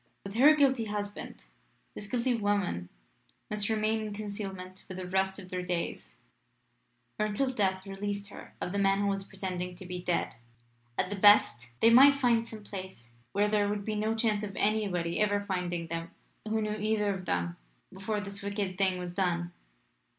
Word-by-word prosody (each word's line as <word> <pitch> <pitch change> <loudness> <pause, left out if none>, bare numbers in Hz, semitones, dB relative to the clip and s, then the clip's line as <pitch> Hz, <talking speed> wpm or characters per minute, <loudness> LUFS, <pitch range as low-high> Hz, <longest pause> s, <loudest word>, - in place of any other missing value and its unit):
With 195 - -7
her 295 +5 +8
guilty 265 -5 +3
husband, 205 -1 -5 0.5
this 205 - -8
guilty 245 +3 +1
woman 205 - 0 0.6
must 210 0 +1
remain 220 0 +1
in 215 -1 -4
concealment 195 -3 -6
for 185 - -7
the 185 0 -5
rest 190 +1 0
of 185 -3 -10
their 180 0 -2
days, 175 - -3 1.0
or 215 - +2
until 255 +6 0
death 190 -4 0
released 200 +1 -4
her - - -11
of 180 - -3
the 200 - -1
man 195 0 +3
who 200 - +1
was 195 0 -1
pretending 185 -2 -5
to 185 +1 -10
be 180 0 -5
dead. 175 -7 -1 0.6
At 185 - 0
the - - -1
best, 195 - +5
they 230 - +7
might 275 +4 +8
find 235 -4 +2
some 220 -2 -9
place 185 - -8 0.2
where 205 +1 +3
there 205 -1 +2
would 205 -1 -2
be 215 - -1
no 215 +1 0
chance 220 -2 +1
of 200 -2 -5
anybody 195 -5 0
ever 205 -1 +3
finding 180 -4 -2
them 165 0 -4 0.4
who 220 0 0
knew 210 0 -1
either 210 -1 +1
of 185 -1 -7
them 85 - -1 0.4
before 205 +2 -2
this 200 0 -6
wicked 200 -2 -3
thing 190 -2 +3
was 180 -1 -5
done. 175 -2 0
200 Hz, 180 wpm, -30 LUFS, 185-215 Hz, 1.0 s, her